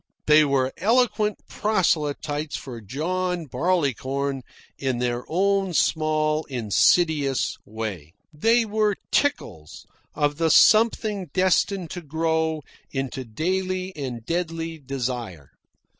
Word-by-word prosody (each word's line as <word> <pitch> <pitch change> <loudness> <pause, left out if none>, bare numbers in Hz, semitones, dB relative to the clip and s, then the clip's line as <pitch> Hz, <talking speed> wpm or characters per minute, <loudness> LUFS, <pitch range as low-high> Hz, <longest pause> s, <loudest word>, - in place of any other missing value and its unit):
They 155 0 +6
were 135 -2 +1
eloquent 215 0 +1
proselyters 155 -7 0
for 120 -4 -7
John 175 - -2
Barleycorn 140 -3 -1 0.4
in 130 -3 -1
their 120 0 -1
own 195 +1 +1
small 155 -1 +1
insidious 135 - +2
way. 100 -8 -6 0.2
They 225 +9 +3
were 210 -1 +1 0.2
tickles 80 - -1 0.3
of 145 -1 0
the 165 0 +2
something 215 0 +4
destined 185 -1 +1
to 175 - -5
grow 160 0 -1 0.3
into 135 0 -4
daily 185 - -2
and 125 -6 -5
deadly 165 -1 -3
desire. 125 - -5
155 Hz, 100 wpm, -24 LUFS, 135-185 Hz, 0.4 s, They